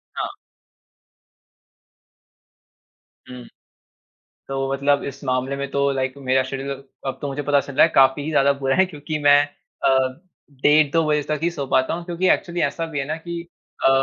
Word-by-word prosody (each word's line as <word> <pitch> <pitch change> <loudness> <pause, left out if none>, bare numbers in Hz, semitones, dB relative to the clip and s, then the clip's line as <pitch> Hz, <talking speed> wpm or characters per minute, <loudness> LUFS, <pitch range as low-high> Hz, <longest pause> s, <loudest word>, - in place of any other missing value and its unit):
हाँ। - - -2 3.0
हुँ। 125 -1 -9 1.1
तो 135 0 -2
मतलब 140 +1 +1
इस 140 +1 -7
मामले 130 +1 -1
में 140 0 -4
तो 140 0 +1
लाइक 130 -1 -2
मेरा 130 -1 +1
शेड्यूल 135 +1 -5 0.2
अब 135 -1 -3
तो 145 - -2
मुझे 140 +1 -4
पता 145 0 +3
चल 140 - -9
रहा - - +6
है, - - -6
काफ़ी 135 +1 +5
ही 155 - -3
ज़्यादा 140 -2 +4
बुरा 135 -1 -1
है 190 - +5
क्योंकि 150 -2 -5
मैं 145 0 +7 0.5
अ, 130 +1 +2 0.3
डेढ़ 145 +2 +3
2 165 -1 +3
बजे 150 -1 +2
तक 155 0 0
ही 170 - +2
सो 145 -5 -5
पाता 130 +2 +1
हूँ, 170 +1 -6
क्योंकि 175 +1 -1
एक्चुअली 175 -1 0
ऐसा 165 +3 -1
भी 150 -3 -5
है 135 - -1
ना 155 +2 -3
कि 170 +1 -6 0.4
अ, - - +7
140 Hz, 180 wpm, -22 LUFS, 135-155 Hz, 3.0 s, मैं